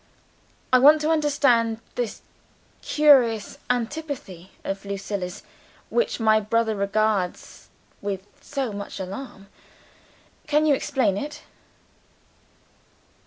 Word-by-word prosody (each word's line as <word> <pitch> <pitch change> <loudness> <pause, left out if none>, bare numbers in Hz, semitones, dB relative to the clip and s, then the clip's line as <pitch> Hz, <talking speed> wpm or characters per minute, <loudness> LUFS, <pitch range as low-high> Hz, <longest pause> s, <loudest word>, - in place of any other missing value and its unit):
"I 255 - +8
want 295 +4 +7
to 310 +1 +1
understand 275 -7 +2
this 240 -3 -4 0.6
curious 255 -8 +3
antipathy 245 - -4
of 195 0 -4
Lucilla's 200 -2 -5 0.5
which 475 - 0
my 220 -1 +4
brother 220 +1 0
regards 200 -2 -1 0.3
with 195 -1 -4 0.2
so 270 -6 -3
much 200 0 -7
alarm. 195 +2 -7 1.0
Can 300 +1 +3
you 300 - +5
explain 265 -8 0
it?" 295 +5 -6
230 Hz, 95 wpm, -24 LUFS, 200-285 Hz, 1.0 s, I